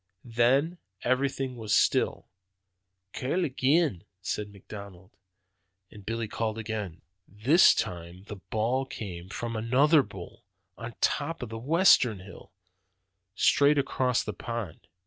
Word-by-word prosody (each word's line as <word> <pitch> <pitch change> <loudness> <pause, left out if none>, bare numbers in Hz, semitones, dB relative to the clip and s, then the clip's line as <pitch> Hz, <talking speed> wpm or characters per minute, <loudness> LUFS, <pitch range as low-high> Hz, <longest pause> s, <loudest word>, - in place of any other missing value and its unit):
Then 130 +9 +2 0.2
everything 130 0 -1
was 110 -2 +1
still. - - +1 0.9
'Call 170 +8 -1
agen,' 135 - +1 0.2
says 105 +2 -3
McDonald, 100 -2 -12 0.8
and 105 - -13
Billy 115 +2 -3
called 110 +1 -3
again. 105 -6 -5 0.2
"This 125 - +5
time 85 +1 -5
the 105 0 -9
bawl 115 +7 -1
came 90 -7 -7
from 115 +2 -5
another 135 +8 +4
bull, 95 -8 -11 0.3
on 115 0 -8
top 150 0 0
of 120 - -6
the 115 0 -6
western 130 - +4
hill, 95 - -13 0.8
straight 145 +7 +4
across 130 -3 +1
the - - -5
pond. 115 -8 -6
115 Hz, 120 wpm, -28 LUFS, 105-135 Hz, 0.9 s, This